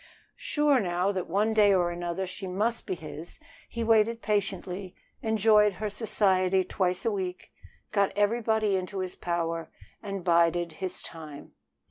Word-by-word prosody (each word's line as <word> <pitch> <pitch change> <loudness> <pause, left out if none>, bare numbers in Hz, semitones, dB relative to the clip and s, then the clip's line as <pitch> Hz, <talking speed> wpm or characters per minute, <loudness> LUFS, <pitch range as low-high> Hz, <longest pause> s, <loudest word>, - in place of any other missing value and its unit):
Sure 295 -3 +2
now 180 -1 0
that 185 -3 -3
one 210 +5 +2
day 210 -2 +5
or 175 -2 +2
another 175 +2 -3
she 190 +1 -7
must 215 +6 -1
be 185 - -1
his, 160 0 -9 0.3
he 235 - -3
waited 225 +1 +3
patiently, 195 -2 -2 0.3
enjoyed 215 -2 +4
her 210 +2 -4
society 190 -3 +2
twice 180 +1 -1
a 230 - +2
week, 185 -3 -4 0.4
got 200 -2 +2
everybody 220 -1 +2
into 185 +1 -3
his 185 -1 -3
power, 165 -1 -2 0.3
and 195 -3 -5
bided 170 0 +3
his 185 +3 -5
time. 155 -3 -10
190 Hz, 145 wpm, -28 LUFS, 175-210 Hz, 0.4 s, day